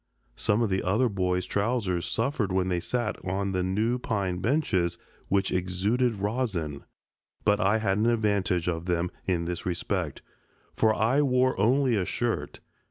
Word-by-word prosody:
Some 105 +3 +1
of 110 - 0
the 95 - +1
other 105 +7 +2
boys' 90 -3 0
trousers 100 -5 -1
suffered 115 -4 -1
when 95 0 +1
they 90 -1 +1
sat 105 +5 -2
on 95 +1 -1
the 95 -1 0
new 110 +7 0
pine 100 -6 -1
benches, 95 - +1 0.3
which 100 0 +1
exuded 100 +7 0
rosin, 100 - -2 0.6
but 105 0 +3
I 100 +3 +3
had 105 -2 0
an 110 - +2
advantage 100 -7 +1
of 85 -1 -2
them 85 0 0 0.2
in 85 -3 0
this 85 0 -4
respect, 90 -3 -2 0.5
for 110 - +3
I 125 +6 +3
wore 130 -2 +2
only 125 +4 +3
a 95 -3 0
shirt. - - -2
100 Hz, 160 wpm, -27 LUFS, 90-115 Hz, 0.6 s, but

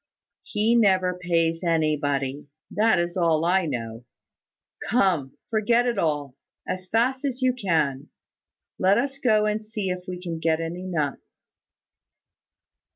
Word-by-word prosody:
"He 215 +2 0
never 190 -5 +3
pays 170 -1 0
anybody; 145 -4 0 0.2
that 220 +2 +3
is 175 0 -1
all 165 -3 +2
I 180 0 +2
know. 115 -4 -5 0.9
Come, 180 - +1
forget 230 +2 +2
it 235 -4 0
all, 145 -5 -1 0.3
as 185 0 -4
fast 255 +4 +1
as 265 -2 -2
you 255 -1 +3
can. 155 - -1 0.7
Let 190 +2 +4
us 270 +3 -2
go 215 -5 +3
and 215 +1 -1
see 215 -3 -3
if 180 0 -5
we 180 -1 -5
can 170 -3 -5
get 160 0 +1
any 165 +2 -4
nuts." 150 -6 -4
180 Hz, 135 wpm, -25 LUFS, 160-215 Hz, 0.9 s, Let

